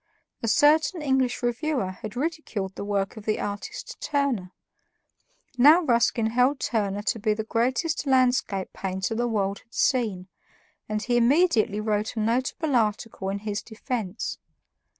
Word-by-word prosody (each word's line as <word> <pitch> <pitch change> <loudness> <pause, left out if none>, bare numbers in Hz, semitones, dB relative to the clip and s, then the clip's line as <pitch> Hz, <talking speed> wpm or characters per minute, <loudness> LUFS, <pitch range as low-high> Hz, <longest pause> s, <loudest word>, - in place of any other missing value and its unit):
A 230 - -2
certain 310 - +3
English 265 -3 +1
reviewer 240 -4 -1
had 210 +4 -8
ridiculed 255 - -3
the - - -6
work 200 0 -2
of 215 - -9
the 215 - +1
artist 205 0 -6
Turner. 270 -11 -1 1.1
Now 300 +7 +8
Ruskin 235 -4 +2
held 250 +4 +2
Turner 205 -3 -1
to 225 +2 -1
be 215 0 +1
the 220 - -3
greatest 260 +7 0
landscape 250 -7 +2
painter 190 +2 -3
the 240 +2 0
world 200 -3 -1
had 230 - -20
seen, 215 -9 +1 0.6
and 215 0 -2
he 245 -1 +1
immediately 240 - +3
wrote 215 +1 -1
a - - -2
notable 255 +7 0
article 215 -3 0
in 195 - -2
his 205 +1 -4
defense. 220 -3 -4
230 Hz, 145 wpm, -26 LUFS, 205-260 Hz, 1.1 s, Now